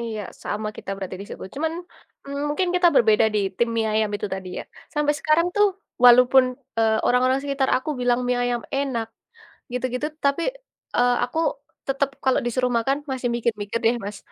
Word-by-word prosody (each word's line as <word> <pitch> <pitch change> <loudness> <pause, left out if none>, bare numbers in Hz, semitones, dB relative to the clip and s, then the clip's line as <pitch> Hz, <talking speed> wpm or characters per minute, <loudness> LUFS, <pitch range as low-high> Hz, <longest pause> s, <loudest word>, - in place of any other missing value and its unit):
Iya 225 -2 -4 0.2
sama 215 +1 -3
kita - - -7
berarti 190 -1 -6
di - - -10
situ, - - -8
cuman, 320 +2 -1 0.5
mmm, 280 +1 -4
mungkin 355 +5 0
kita 360 -1 +4
berbeda 220 -2 +5
di - - +3 0.2
tim 235 - +2
mie 225 -1 +1
ayam 215 0 +2
itu 210 - -4
tadi 185 -1 -7
ya, - - -17 0.3
sampai 295 0 +2
sekarang 315 +3 +3
tuh 415 0 +6 0.4
walaupun, 250 +2 +8 0.3
eee, 220 -1 +3
orang-orang 255 +2 +3
sekitar 275 -1 0
aku 305 +4 -3
bilang 245 0 +2
mie 250 0 +1
ayam 245 -1 -1
enak 265 -5 -1 0.6
gitu-gitu, 250 +3 -2 0.2
tapi, 280 +4 +2 0.5
eee, 245 0 +4
aku 250 +6 -4 0.5
tetep 275 0 +1 0.2
kalau 260 - +3
disuruh 250 +1 0
makan 270 +5 0
masih 255 -2 -1
mikir-mikir 220 -2 -1
deh, 230 +2 +4
Mas, 205 0 -6
250 Hz, 175 wpm, -23 LUFS, 225-275 Hz, 0.6 s, walaupun